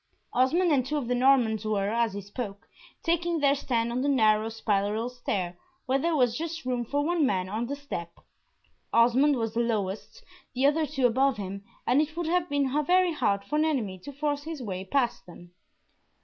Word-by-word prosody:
Osmond 320 +8 +3
and 270 -4 +3
two 295 +4 -2
of 270 -5 -3
the 250 - +1
Normans 245 -4 +3
were, 205 -2 0
as 230 -1 +1
he 200 - -5
spoke, 205 +1 -7 0.4
taking 340 0 0
their 280 -1 +4
stand 235 -4 -1
on 245 +2 -1
the 285 - +1
narrow 220 -4 +3
spiral 215 +1 -1
stair, 190 -8 -3 0.3
where 265 +2 +1
there 335 +3 0
was 245 -5 +2
just 325 0 -5
room 250 -1 -1
for 285 +5 -1
one 340 -1 +1
man 190 -8 +1
on 220 +5 -3
the 280 - -3
step. 225 -13 -7 0.7
Osmond 250 +5 +4
was 225 -3 -2
the 230 - -1
lowest, 215 -4 -2 0.3
the 260 +2 +2
other 305 +2 +3
two 270 -3 0
above 260 +1 +3
him, 195 0 -6 0.2
and 260 +4 +4
it 310 +1 -4
would 345 - -1
have 350 +1 0
been 280 -2 0
very 360 +2 +3
hard 205 -9 0
for 300 - -1
an 310 - +3
enemy 225 -12 -1
to 285 - -9
force 290 +1 -2
his 315 0 -6
way 190 -6 -4
past 240 +2 -1
them. 175 0 -13
250 Hz, 200 wpm, -27 LUFS, 215-290 Hz, 0.7 s, their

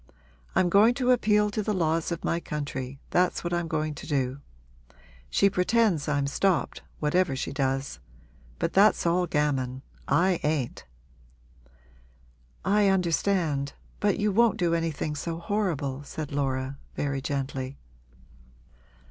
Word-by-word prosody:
I'm 185 -1 +4
going 210 +7 +5
to 255 -1 +2
appeal 210 -4 +3
to 215 - -1
the 210 0 -1
laws 165 -1 0
of 170 - -4
my 170 - +1
country 140 -4 -5
that's 180 +1 +2
what 175 0 -2
I'm 175 -1 0
going 155 -1 -1
to - - -9
do. 135 -1 -1 0.9
She 200 - +4
pretends 195 -3 +2
I'm 140 -2 +1
stopped, 180 +5 0 0.2
whatever 160 0 +1
she 130 - -3
does. 135 -1 -1 0.6
But 165 - -1
that's 200 0 +4
all 175 +1 +2
gammon 135 -4 -1 0.2
I 180 0 +3
ain't!' 145 - -2 1.8
'I 205 +1 +4
understand 170 -6 +1 0.3
but 205 -2 +2
you 210 0 +1
won't 225 +2 +3
do 175 -4 +1
anything 165 -2 -1
so 165 +3 -4
horrible,' 165 -8 -2
said 145 +1 -6
Laura, 135 -1 -2 0.2
very 140 -1 -2
gently. 135 -1 -3
165 Hz, 130 wpm, -27 LUFS, 140-190 Hz, 1.8 s, going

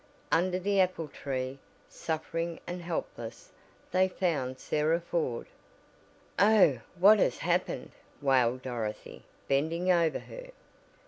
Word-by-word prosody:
Under 180 +2 +2
the 200 +2 +1
apple 180 -4 -1
tree, 130 -1 -4 0.3
suffering 165 +1 -3
and 175 +1 -5
helpless, 160 -9 -5 0.4
they 185 +1 +4
found 145 -9 -1
Sarah 155 +5 +1
Ford. 165 -8 -2 0.9
"Oh, 200 - +5 0.2
what 205 +4 +7
has - - +2
happened!" - - -1 0.3
wailed 130 -2 +2
Dorothy, 115 -4 -5 0.3
bending 165 +6 +1
over 170 -3 +3
her. - - -10
165 Hz, 110 wpm, -30 LUFS, 130-180 Hz, 0.9 s, what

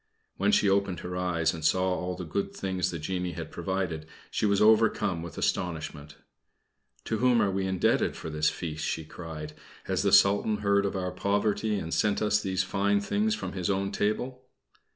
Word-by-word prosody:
When - - +2
she 210 - +4
opened 100 -2 +1
her 90 0 -5
eyes 90 -3 0
and 80 -1 -7
saw 95 +4 +2
all 90 0 -3
the 90 - -6
good 100 +5 -3
things 95 -1 -1
the 85 - -4
genie 90 +2 -3
had - - -7
provided, 90 -5 -3 0.2
she 105 - +1
was 100 -1 +2
overcome 105 -5 +3
with 85 -2 -8
astonishment. 80 -4 -2 0.9
"To 110 - -1
whom 125 -1 +4
are 100 - +2
we 95 0 -1
indebted 95 -1 +1
for 80 - -6
this 75 0 +2
feast?" 80 -3 -5
she 80 - -2
cried. 75 -2 -8 0.3
"Has - - -1
the - - +2
Sultan 100 +2 +5
heard 100 0 +3
of 100 - -4
our 90 -1 -2
poverty 105 +3 0
and 85 -3 -4
sent 105 -1 +2
us 105 0 +2
these 95 -2 0
fine 100 +2 +1
things 210 - 0
from - - -5
his 90 -1 -2
own 100 0 0
table?" 120 +6 -1
95 Hz, 190 wpm, -28 LUFS, 85-100 Hz, 0.9 s, Sultan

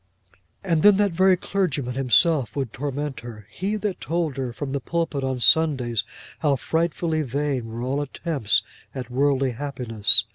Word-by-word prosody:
And 165 -5 +1
then 205 +1 +6
that 205 -1 +2
very 185 +2 +4
clergyman 155 -11 -2
himself 135 +1 +2
would 135 -6 -3
torment 145 0 -4
her; 110 -4 -10
he 200 +4 -2
that 210 -3 -3
told 165 -4 -2
her 130 -3 -3
from 135 +3 -5
the 140 - -1
pulpit 165 -1 -2
on 130 -1 -2
Sundays 125 -6 +3 0.4
how 145 -3 +2
frightfully 160 +5 -1
vain 140 -2 -2
were 115 +2 -6
all 135 +3 -1
attempts 145 - 0 0.3
at 125 -2 -6
worldly 135 0 +1
happiness. 115 -6 +4
140 Hz, 155 wpm, -23 LUFS, 125-165 Hz, 0.4 s, then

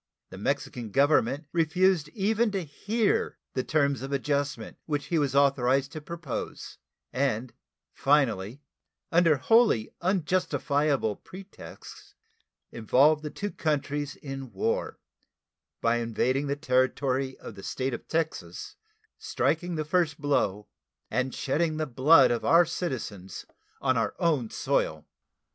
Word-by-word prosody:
The 95 - -9
Mexican 135 -1 -2
Government 140 +3 +2
refused 170 0 +2
even 220 +3 +2
to 195 -2 -1
hear 205 +9 -1 0.2
the 130 - -1
terms 140 -3 +1
of 135 +1 -6
adjustment 140 0 -2
which 145 -2 -2
he 170 - 0
was 140 -2 0
authorized 135 -1 +3
to 155 - -7
propose, 165 -4 -6 0.3
and 130 -2 -1 0.4
finally, 135 -3 +1 0.5
under 165 -3 +4
wholly 220 - +3
unjustifiable 155 - 0
pretexts, 190 +1 -12 0.6
involved 135 +7 +3
the 150 - -5
two 205 +7 -5
countries 145 -1 -2
in 135 -3 -7
war 95 - -2 0.8
by 115 0 +2
invading 125 +4 0
the 140 - 0
territory 130 -1 0
of - - -9
the 95 - -11
State 130 +6 -3
of - - -6
Texas, 160 -1 -3 0.4
striking 175 -1 -1
the 155 -1 -2
first 160 -1 +1
blow, 105 -8 0 0.4
and 130 0 -1
shedding 155 +3 0
the 155 - -1
blood 135 +1 +5
of 120 - -1
our 170 +1 +6
citizens 115 - -5 0.4
on 130 -2 +2
our 115 - -1
own 155 - +1
soil. - - -1
145 Hz, 125 wpm, -27 LUFS, 130-160 Hz, 0.8 s, our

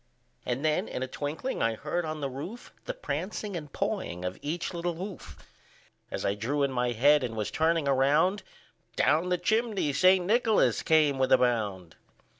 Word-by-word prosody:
And 125 +5 -1
then 155 0 +1
in 130 - -4
a - - -3
twinkling 150 - -4
I 115 0 +1
heard 160 +8 -3
on 155 -1 -4
the 140 - -1
roof, 150 - -8
The - - -4
prancing 210 - -4
and 150 -4 -6
pawing 185 - -3
of 90 0 -4
each 165 +5 -3
little 175 0 -2
hoof. 180 - -8 0.7
As - - -4
I 100 - +2
drew 130 +8 -1
in 140 - +1
my 125 -1 0
head, 145 +5 +4
and 115 -3 -3
was 105 -2 -3
turning 160 -2 +1
around, 145 +9 +3 0.5
Down 165 +4 +2
the 180 - +2
chimney 215 -7 0
St. 185 +4 +4
Nicholas 225 +1 +3
came 150 -4 +3
with 130 0 +1
a - - +8
bound. 105 -9 -1
150 Hz, 180 wpm, -28 LUFS, 130-180 Hz, 0.7 s, a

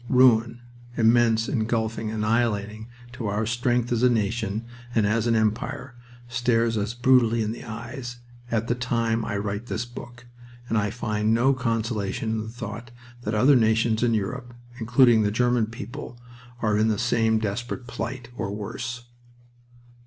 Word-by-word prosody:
Ruin, 120 -2 +4 0.4
immense, 115 -1 +4
engulfing, 110 -2 -1
annihilating 110 -1 -1 0.3
to 120 -3 -4
our 105 +2 0
strength 120 +1 0
as 120 -1 +1
a 125 - +5
nation 110 -1 -1 0.3
and 110 -3 +3
as 110 +2 +1
an 115 - +3
empire, 110 +4 -1 0.3
stares 120 -1 +1
us 105 +2 -2
brutally 120 -2 +4
in 105 - -2
the 115 - -7
eyes 120 +2 -7 0.3
at 115 -1 0
the 120 - +2
time 115 -2 0
I 105 - -2
write 105 +3 -3
this 120 0 -2
book, 120 0 -11 0.4
and 115 - -1
I 105 -2 +1
find 110 -1 0
no 130 +4 +4
consolation 115 -3 -1
in 110 -1 -1
the 110 - -6
thought 115 0 -7 0.3
that 110 -2 -2
other 130 +6 +5
nations 110 -1 +3
in 120 -2 +3
Europe, 120 +4 -4 0.2
including 120 0 +5
the 105 - +2
German 120 +1 +2
people, 120 +3 -8 0.4
are 105 -1 +2
in 110 - +3
the 110 -2 +1
same 115 -1 +2
desperate 115 +4 -3
plight, 120 +1 -5
or 100 - -3
worse. 120 +4 -5
115 Hz, 155 wpm, -25 LUFS, 110-120 Hz, 0.4 s, a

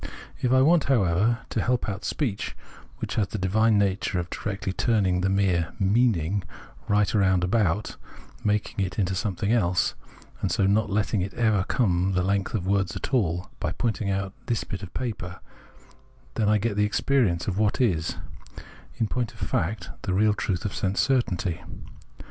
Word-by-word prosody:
If 125 - +1
I 130 0 +5
want, 165 +2 +4
how 130 -7 +3
ever, 100 +7 +2
to - - 0
help 125 0 0
out 100 -1 -4
speech 115 -10 -2 0.2
— - - -22
which - - -4
has 100 - +1
the 105 - -5
divine 105 +3 +3
nature 100 -1 +1
of 90 0 -3
directly 100 -2 -3
turning 95 -5 +1
the 95 - +1
mere 95 -3 +1
" - - -24
meaning 100 -3 +2 0.2
" - - -23
right 105 -2 +2
round 95 -4 +3
about, 100 0 0 0.5
making 105 -1 0
it 95 0 -4
into 95 -3 +1
something 100 +1 -1
else, 90 -6 +2 0.5
and - - 0
so 100 - +2
not 105 +2 +2
letting 105 0 0
it 95 +1 -4
ever 110 -5 +2
come 95 -6 +1
the 90 - +2
length 100 +2 0
of 95 -5 -2
words 95 -2 +1
at - - -5
all 90 -7 0
— - - -32
by - - -2
pointing 110 -3 -1
out 100 0 -2
this 115 -2 0
bit 95 - -6
of 95 - -8
paper, 100 -8 -4 0.9
then 110 -2 +1
I 105 - +4
get 105 0 -1
the 105 - +2
experience 105 -4 +1
of 100 -1 -1
what 105 -1 +1
is, 85 -11 +1 0.8
in 115 - 0
point 120 0 -2
of - - -17
fact, 100 +7 -2
the 95 -3 -1
real 105 +2 +4
truth 95 -3 -2
of 100 - -2
sense 95 0 -1
certainty. 95 -10 +1
100 Hz, 190 wpm, -26 LUFS, 95-110 Hz, 0.9 s, I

